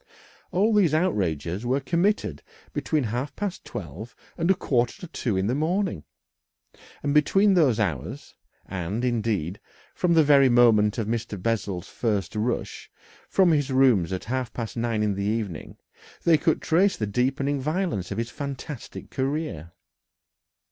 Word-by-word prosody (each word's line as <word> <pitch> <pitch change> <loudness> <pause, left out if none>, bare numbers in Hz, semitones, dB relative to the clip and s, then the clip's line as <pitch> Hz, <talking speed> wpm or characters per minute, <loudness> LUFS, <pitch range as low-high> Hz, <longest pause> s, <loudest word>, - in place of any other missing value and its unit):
All 210 +5 +2
these 180 -8 +4
outrages 95 - 0
were 130 +3 +1
committed 175 +9 0 0.3
between 155 -3 0
half 125 +5 -3
past 200 -3 -4
twelve 100 - -8 0.2
and 170 0 -1
a 190 - +5
quarter 125 -8 0
to 180 - -7
two 120 - -2
in 95 - +1
the 115 - +1
morning, 165 - -1 1.0
and 145 0 0
between 195 +7 +4
those 150 - +3
hours - - -3 0.3
and, 95 +6 -3
indeed, 105 -7 -1 0.3
from 175 -2 +1
the 160 - +6
very 140 -2 +6
moment 115 -3 +4
of 115 - -1
Mr. 110 -2 -3
Bessel's 100 -3 -2
first 105 -4 -2
rush 115 +3 -2 0.4
from 185 -3 +4
his 145 -3 +1
rooms 125 -10 +4
at 95 - -3
half 125 +1 -3
past 115 -3 -5
nine 115 -2 0
in 105 -1 +1
the 100 - -4
evening 105 -4 -3 0.5
they 170 - +5
could 160 +1 +1
trace 185 +4 +3
the 110 - -1
deepening 135 +6 0
violence 155 - -1
of 100 - -4
his 115 +1 -3
fantastic 140 -1 -7
career. 130 - -3
125 Hz, 150 wpm, -25 LUFS, 105-155 Hz, 1.0 s, the